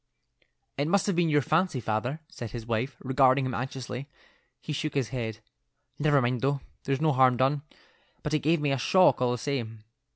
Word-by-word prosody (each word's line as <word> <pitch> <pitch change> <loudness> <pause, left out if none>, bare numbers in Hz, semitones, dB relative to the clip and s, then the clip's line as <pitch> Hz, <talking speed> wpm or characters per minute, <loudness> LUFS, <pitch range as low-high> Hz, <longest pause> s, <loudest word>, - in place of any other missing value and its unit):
"It 145 - +1
must 200 +3 +2
have 200 - 0
been 170 -1 +2
your 145 -2 +3
fancy, 160 -2 +1
father," 120 +7 -2
said 120 -10 -7
his 115 -1 -7
wife, 115 +4 -2
regarding 130 0 +3
him 130 - -3
anxiously. 130 +1 -5 0.5
He 155 - -5
shook 155 +1 -3
his 130 -6 0
head. 115 -3 -4 0.6
"Never 145 -1 +4
mind, 120 -1 0
though; 140 +1 0 0.2
there's 135 +1 0
no 155 -1 +3
harm 130 -1 +4
done, 135 +3 +2 0.6
but 150 - -3
it 155 - +3
gave 160 +4 +2
me 145 -1 0
a 135 - 0
shock 185 0 +4
all 125 - +3
the 125 - -1
same." 115 -4 -4
135 Hz, 195 wpm, -28 LUFS, 125-150 Hz, 0.6 s, Never